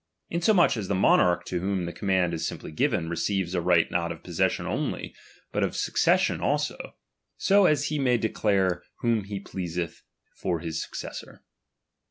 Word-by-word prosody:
Insomuch 175 Hz, -, +3 dB
as 100 Hz, -3 st, -3 dB
the 100 Hz, -, 0 dB
monarch 90 Hz, -1 st, +4 dB
to 90 Hz, -, -2 dB
whom 95 Hz, 0 st, -1 dB
the 85 Hz, -, -5 dB
command 95 Hz, -3 st, +1 dB
is 80 Hz, -, -2 dB
simply -, -, -7 dB
given, 80 Hz, +1 st, 0 dB
receives 90 Hz, +2 st, -1 dB
a 90 Hz, -, 0 dB
right 85 Hz, -1 st, +3 dB
not 85 Hz, -1 st, 0 dB
of 80 Hz, -, -9 dB
possession -, -, 0 dB
only, -, -, -3 dB, 0.4 s
but -, -, -1 dB
of -, -, -1 dB
succession -, -, +2 dB
also; -, -, -2 dB, 0.4 s
so 200 Hz, -1 st, +5 dB
as 145 Hz, -1 st, +2 dB
he 150 Hz, -1 st, -1 dB
may 125 Hz, -3 st, +3 dB
declare 95 Hz, -5 st, +1 dB, 0.2 s
whom 115 Hz, -4 st, +1 dB
he 100 Hz, 0 st, -5 dB
pleaseth 90 Hz, -3 st, -5 dB, 0.3 s
for 85 Hz, -2 st, -2 dB
his 80 Hz, -1 st, -3 dB
successor. -, -, -8 dB
95 Hz, 165 wpm, -26 LUFS, 85-110 Hz, 0.4 s, so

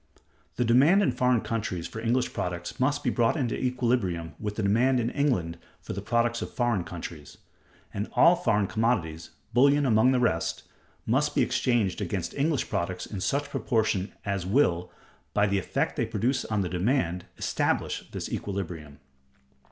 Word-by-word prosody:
The 125 Hz, -, 0 dB
demand 145 Hz, -, +5 dB
in 135 Hz, -, +2 dB
foreign 125 Hz, -1 st, +2 dB
countries 95 Hz, -7 st, -3 dB
for 110 Hz, -, -8 dB
English 120 Hz, +3 st, 0 dB
products 90 Hz, -1 st, -4 dB
must 145 Hz, +3 st, +1 dB
be 125 Hz, -, +1 dB
brought 120 Hz, +6 st, +2 dB
into 125 Hz, -5 st, -1 dB
equilibrium 115 Hz, -10 st, -1 dB
with 105 Hz, -1 st, -4 dB
the 110 Hz, -, -2 dB
demand 120 Hz, +6 st, +3 dB
in 120 Hz, 0 st, -1 dB
England 90 Hz, -, 0 dB, 0.2 s
for -, -, -7 dB
the 100 Hz, -, -4 dB
products 120 Hz, +2 st, 0 dB
of -, -, -5 dB
foreign 120 Hz, -7 st, 0 dB
countries; 85 Hz, -4 st, -8 dB, 0.6 s
and 100 Hz, +2 st, -3 dB
all 170 Hz, +1 st, +6 dB
foreign 110 Hz, -, +1 dB
commodities, 85 Hz, -8 st, -1 dB, 0.2 s
bullion 140 Hz, +4 st, +4 dB
among 115 Hz, +1 st, +4 dB
the 130 Hz, -, +2 dB
rest, 90 Hz, -9 st, 0 dB, 0.4 s
must -, -, +1 dB
be -, -, +4 dB
exchanged 115 Hz, -7 st, 0 dB
against 90 Hz, -5 st, -3 dB
English 145 Hz, 0 st, 0 dB
products 90 Hz, +1 st, -2 dB
in 100 Hz, -3 st, -6 dB
such 145 Hz, +6 st, -1 dB
proportions 110 Hz, -8 st, 0 dB, 0.2 s
as 100 Hz, -2 st, -1 dB
will, 90 Hz, -4 st, +1 dB, 0.4 s
by 105 Hz, -, +4 dB
the 100 Hz, -1 st, +1 dB
effect -, -, -2 dB
they 120 Hz, -, +1 dB
produce 115 Hz, +5 st, 0 dB
on 105 Hz, -2 st, -1 dB
the 95 Hz, -, -1 dB
demand, 90 Hz, -2 st, 0 dB
establish -, -, -1 dB
this -, -, -5 dB
equilibrium. 85 Hz, -7 st, -5 dB
110 Hz, 165 wpm, -27 LUFS, 90-125 Hz, 0.6 s, all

